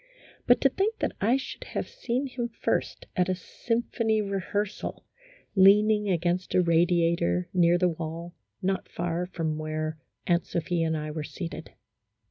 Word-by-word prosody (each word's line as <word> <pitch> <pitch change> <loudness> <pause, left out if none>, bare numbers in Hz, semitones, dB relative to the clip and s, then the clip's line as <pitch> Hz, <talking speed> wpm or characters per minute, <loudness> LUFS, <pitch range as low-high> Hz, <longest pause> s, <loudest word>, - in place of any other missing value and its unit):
But 245 - +6
to 270 - +5
think 415 - 0
that - - -1
I 235 +6 +4
should 270 - -7
have - - -4
seen 255 +3 -2
him 250 -3 -3
first 230 - -2
at 180 0 +2
a 185 - +1
symphony 230 +3 -1
rehearsal, 200 0 -3 0.5
leaning 210 +2 +6
against 175 +1 0
a 185 - +6
radiator 170 - +2
near 175 -1 +4
the 180 0 +3
wall, 165 +1 -5 0.3
not 190 +1 -1
far 175 +1 -2
from 160 -4 -2
where 155 0 -3 0.3
Aunt 170 -1 +2
Sophia 170 -1 0
and 160 0 0
I 150 0 -4
were 155 0 -4
seated. 165 0 -7
180 Hz, 150 wpm, -27 LUFS, 165-210 Hz, 0.5 s, But